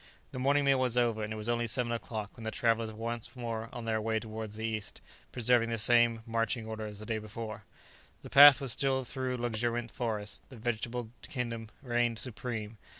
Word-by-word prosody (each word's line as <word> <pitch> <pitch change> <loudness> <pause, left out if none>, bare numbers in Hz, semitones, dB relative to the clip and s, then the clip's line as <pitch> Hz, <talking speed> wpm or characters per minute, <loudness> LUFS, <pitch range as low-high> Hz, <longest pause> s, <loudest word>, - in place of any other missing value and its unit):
The 130 - -5
morning 140 +2 +3
meal 135 -1 +4
was 125 -2 +1
over, 115 -3 +2
and 105 - -4
it - - -3
was 110 0 -4
only 120 0 0
seven 120 0 0
o'clock 110 -3 -4
when 115 - -10
the 110 - -2
travellers 115 -1 +1
were 110 - -12
once 115 +1 -4
more 115 -2 -4
on 120 -1 -7
their 110 -1 0
way 110 0 0
towards 110 -1 -6
the 110 +1 -3
east, 110 -2 -3 0.3
preserving 120 -1 +3
the 115 - -1
same 115 0 +4
marching 115 0 -1
order 110 -1 -5
as 105 -1 -7
on 110 - -7
the 115 - -2
day 110 - -1
before. 110 0 -7 0.6
The - - -10
path 145 -1 +10
was 135 -3 0
still 135 +1 +1
through 130 +1 -3
luxuriant 120 0 -1
forest. 105 -3 -3
The 130 - -11
vegetable 120 0 -3 0.2
kingdom 115 -4 -4
reigned 120 -2 +1
supreme. 115 -2 -5
115 Hz, 210 wpm, -31 LUFS, 110-120 Hz, 0.6 s, path